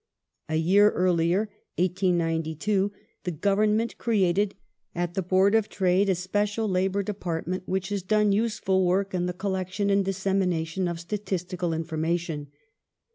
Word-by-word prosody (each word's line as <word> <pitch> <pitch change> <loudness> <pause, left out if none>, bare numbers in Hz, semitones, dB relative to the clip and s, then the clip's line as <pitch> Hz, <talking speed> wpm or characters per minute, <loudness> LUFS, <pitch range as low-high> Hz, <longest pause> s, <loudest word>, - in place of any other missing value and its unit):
A 160 - 0
year 190 +6 +5
earlier 175 +1 +2 0.3
(1892) 175 +1 0 0.3
the 180 - -2
Government 210 +6 +1
created 200 -3 +1 0.4
at 175 0 -2
the 190 - -1
Board 190 +3 +3
of 220 -2 +2
Trade 190 +1 +2
a 190 - +3
special 205 +4 -1
Labour 190 +1 +1
de 210 - -3
partment 180 -1 -3
which 190 +1 -1
has 200 -1 -2
done 210 +2 +2
useful 200 -3 +1
work 190 +2 +1
in 180 -1 0
the - - -1
collection 190 +2 -2
and 200 0 +3
dis 195 -1 -2
semination 185 -2 0
of 170 -1 -4
statistical 180 -1 -3
information. 160 -1 -2
185 Hz, 140 wpm, -26 LUFS, 175-200 Hz, 0.4 s, year